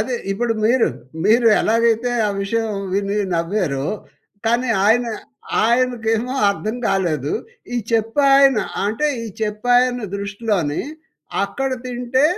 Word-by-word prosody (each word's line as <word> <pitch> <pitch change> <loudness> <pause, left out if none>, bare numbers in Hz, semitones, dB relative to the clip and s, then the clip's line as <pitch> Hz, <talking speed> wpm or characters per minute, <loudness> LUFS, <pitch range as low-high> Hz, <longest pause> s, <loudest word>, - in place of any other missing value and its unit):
అదే 245 +3 -1 0.2
ఇప్పుడు 235 +2 0
మీరూ, 240 +1 +3 0.4
మీరు 230 +2 +5
ఎలాగైతే 230 +2 +2 0.2
ఆ - - 0
విషయం 225 +2 -1 0.2
విని 200 +1 0 0.2
నవ్వారో, 165 -6 -1 0.6
కానీ 240 +1 +1 0.2
ఆయన, 245 +3 +4 0.6
ఆయనకేమో 235 0 +1 0.2
అర్థం 215 +3 -4
కాలేదు. 155 -7 0 0.4
ఈ - - 0 0.2
చెప్పే 225 +5 +1 0.2
ఆయన 270 -4 +5 0.3
అంటే 220 +8 0 0.2
ఈ - - -5 0.2
చెప్పే 215 +3 -2
ఆయన 250 -2 -1
దృష్టిలోనీ 200 -6 -2 0.6
అక్కడ 265 +7 -3 0.2
తింటే, 250 +2 0
225 Hz, 115 wpm, -20 LUFS, 200-245 Hz, 0.6 s, మీరు